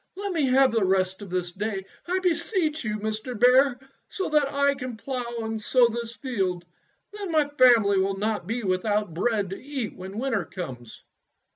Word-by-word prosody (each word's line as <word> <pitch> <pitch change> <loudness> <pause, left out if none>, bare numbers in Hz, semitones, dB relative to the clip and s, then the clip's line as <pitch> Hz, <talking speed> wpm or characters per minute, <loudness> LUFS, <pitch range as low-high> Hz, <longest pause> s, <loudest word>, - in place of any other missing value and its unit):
Let 400 0 -3
me 315 -5 +2
have 265 +1 +5
the 225 -2 +1
rest 190 0 +1
of 200 - -8
this 180 -1 -2
day, 195 0 -3 0.2
I 365 +2 +1
beseech 340 -3 0
you, 215 -1 -2
Mr. 215 +2 -4
Bear, 250 +2 +5 0.3
so 385 - -3
that 295 -2 +2
I 280 0 +2
can 255 -4 -6
plough 240 -2 -4
and 220 0 -3
sow 245 +2 +4
this 235 0 -5
field. 190 -10 -2 0.5
Then 405 -4 -5
my 310 -2 +3
family 235 -8 +5
will 195 +1 0
not 215 +1 -2
be 230 +2 -2
without 205 0 0
bread 200 +1 0
to 195 - -6
eat 270 -5 -4
when 190 +2 -8
winter 250 -3 0
comes." 125 - -8
230 Hz, 180 wpm, -26 LUFS, 195-275 Hz, 0.5 s, have